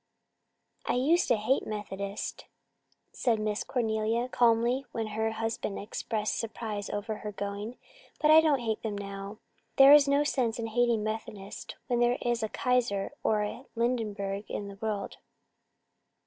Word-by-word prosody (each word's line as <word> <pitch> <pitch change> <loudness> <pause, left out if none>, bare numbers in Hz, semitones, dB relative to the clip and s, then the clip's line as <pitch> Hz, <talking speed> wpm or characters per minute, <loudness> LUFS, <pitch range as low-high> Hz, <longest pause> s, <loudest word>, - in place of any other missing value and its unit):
"I - - +2
used 315 +8 +3
to 240 - +4
hate 220 +5 0
Methodists," 200 -1 -5 0.7
said 230 -4 +1
Miss 215 -1 -1
Cornelia 225 0 0
calmly, 240 +2 +3
when 225 -1 -2
her 220 +1 0
husband 225 -2 -3
expressed 215 +1 -2
surprise 215 -2 -4
over 210 +1 -3
her 210 - -6
going, 205 +4 -5 0.4
"but 305 0 +4
I 315 +1 +9
don't 295 -5 +2
hate 220 -2 -2
them 210 -2 -3
now. 200 +1 -6 0.4
There 275 +1 +9
is 295 -1 +7
no 280 +1 +3
sense 250 -6 0
in 230 - -3
hating 230 -1 +2
Methodists 215 -2 -5
when 245 -2 0
there 240 +1 +3
is 240 -1 0
a 220 - -1
Kaiser 240 -7 0
or 210 -1 +2
a 225 +5 -5
Hindenburg 210 -4 -1
in 200 -1 -4
the 200 0 -11
world." 210 -3 -3
220 Hz, 150 wpm, -29 LUFS, 210-245 Hz, 0.7 s, I